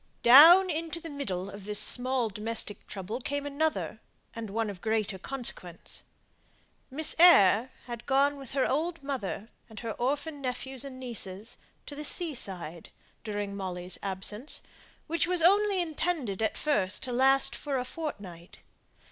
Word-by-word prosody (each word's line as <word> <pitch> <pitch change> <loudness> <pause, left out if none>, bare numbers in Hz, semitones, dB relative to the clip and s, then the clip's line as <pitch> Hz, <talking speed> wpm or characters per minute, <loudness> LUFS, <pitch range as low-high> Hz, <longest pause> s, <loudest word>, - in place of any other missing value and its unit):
Down 335 +9 +9
into 325 +1 -3
the 330 -1 -8
middle 195 -11 -4
of 200 -1 -10
this 210 0 0
small 255 -2 0
domestic 210 0 -1
trouble 205 +4 -5
came 285 +3 -3
another, 305 +2 -2 0.3
and 230 -2 -6
one 225 +2 -1
of 195 -3 -7
greater 220 -3 -1
consequence. 190 -8 -5 0.8
Miss 295 +3 -1
Eyre 245 - +7 0.2
had 240 -1 -8
gone 280 +1 +3
with 270 -3 -9
her 270 -1 +2
old 320 +3 -1
mother, 235 -6 -4 0.2
and 220 - -9
her 230 -1 -4
orphan 285 +5 -2
nephews 260 0 -3
and 265 -2 -8
nieces, 225 -4 -6 0.3
to - - -8
the 295 +1 -6
sea 325 +1 +1
side, 175 - -6 0.3
during 205 -2 -4
Molly's 185 -2 -4
absence, 200 +7 -3 0.4
which 335 +2 0
was 360 -2 +1
only 400 +2 +4
intended 315 - -2
at 220 - 0
first 205 -11 0
to 250 - -3
last 270 +2 +4
for 280 -3 -3
a 250 - -2
fortnight. 200 - -7
250 Hz, 150 wpm, -29 LUFS, 205-290 Hz, 0.8 s, Down